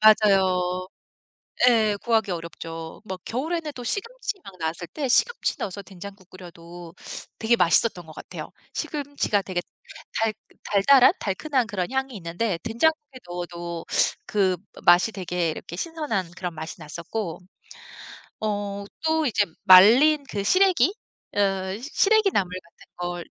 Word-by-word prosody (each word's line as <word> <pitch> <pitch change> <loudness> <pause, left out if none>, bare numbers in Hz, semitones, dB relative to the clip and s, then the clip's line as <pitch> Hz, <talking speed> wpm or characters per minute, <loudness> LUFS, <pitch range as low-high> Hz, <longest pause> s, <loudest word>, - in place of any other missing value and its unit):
맞아요. 190 -4 +4 0.8
예. 220 -3 +3
구하기 225 -4 +2
어렵죠. 165 -1 -7
뭐 190 -2 -5
겨울에는 310 +6 -3
또 250 - -8
시금치 420 - -4
막 190 -2 -12
나왔을 165 +1 -3
때 275 - -3
시금치 475 - +2
넣어서 200 +1 -4
된장국 195 -1 -11
끓여도 175 -1 -11 0.5
되게 225 +2 +3
맛있었던 180 -1 +2
것 160 - -12
같아요. - - -8 0.2
시금치가 285 -8 -1
되게 185 -2 -3 0.6
달 225 -1 +2 0.3
달달한, 255 - +5
달큰한 250 +5 -1
그런 190 -5 -3
향이 265 0 -1
있는데 175 +3 -2
된장국에 285 +4 0
넣어도 175 -1 -5 0.4
그 190 -3 +1 0.3
맛이 175 +5 +6
되게 180 -3 -1
이렇게 160 - -8
신선한 265 - -3
그런 180 -2 -4
맛이 160 +1 -7
났었고 170 +4 -5 1.0
어 205 -1 -2 0.2
또 320 0 +2
이제 210 -5 +2 0.2
말린 245 +12 +8
그 200 - -2
시래기 370 - +4 0.4
어 195 -1 0
시래기 400 - +3
나물 185 - 0
같은 170 - -21
걸 175 -1 -4
200 Hz, 280 characters per minute, -25 LUFS, 175-255 Hz, 1.0 s, 말린